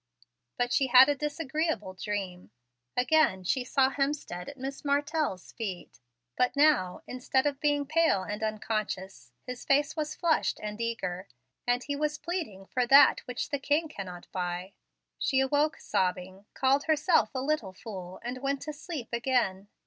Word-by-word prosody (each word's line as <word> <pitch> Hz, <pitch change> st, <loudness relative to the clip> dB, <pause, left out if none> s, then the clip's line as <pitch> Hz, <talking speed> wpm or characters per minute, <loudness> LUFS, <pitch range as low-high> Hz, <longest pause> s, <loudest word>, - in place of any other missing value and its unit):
But 245 Hz, 0 st, 0 dB
she 270 Hz, -, +3 dB
had 255 Hz, +2 st, +8 dB
a 290 Hz, -, +2 dB
disagreeable 295 Hz, -, -2 dB
dream. 185 Hz, -, -4 dB, 0.5 s
Again 250 Hz, -8 st, +3 dB
she 250 Hz, +8 st, 0 dB
saw 265 Hz, +1 st, +2 dB
Hemstead 275 Hz, -12 st, -2 dB
at 280 Hz, -, -10 dB
Miss 270 Hz, +1 st, -6 dB
Martell's 290 Hz, -, -1 dB
feet; 195 Hz, -6 st, -6 dB, 0.4 s
but 250 Hz, -, +1 dB
now, 285 Hz, -12 st, +3 dB
instead 255 Hz, +2 st, 0 dB
of 285 Hz, -2 st, 0 dB
being 290 Hz, -1 st, +1 dB
pale 310 Hz, -, +2 dB
and 205 Hz, +2 st, -5 dB
unconscious, 210 Hz, -, -3 dB
his 250 Hz, -1 st, -6 dB
face 280 Hz, +2 st, +2 dB
was 310 Hz, -1 st, -3 dB
flushed 330 Hz, -2 st, +1 dB
and 210 Hz, +1 st, -5 dB
eager, 190 Hz, -5 st, -3 dB, 0.4 s
and 245 Hz, +1 st, +2 dB
he 285 Hz, -, -3 dB
was 300 Hz, +1 st, -1 dB
pleading 315 Hz, -, -4 dB
for 250 Hz, +4 st, -1 dB
that 275 Hz, +3 st, +7 dB
which 250 Hz, +2 st, -3 dB
the 285 Hz, -2 st, -1 dB
king 295 Hz, +4 st, +1 dB
cannot 185 Hz, -, -8 dB
buy. 180 Hz, +1 st, -3 dB, 0.5 s
She 265 Hz, -4 st, +2 dB
awoke 290 Hz, +4 st, +2 dB
sobbing, 185 Hz, +2 st, -2 dB
called 270 Hz, +2 st, +2 dB
herself 310 Hz, -, +3 dB
a -, -, 0 dB
"little 265 Hz, -7 st, -1 dB
fool," 185 Hz, -3 st, -8 dB
and 250 Hz, +2 st, -4 dB
went 275 Hz, +1 st, -2 dB
to 305 Hz, +1 st, -5 dB
sleep 295 Hz, -4 st, -6 dB
again. 235 Hz, -6 st, 0 dB
255 Hz, 155 wpm, -29 LUFS, 195-290 Hz, 0.5 s, had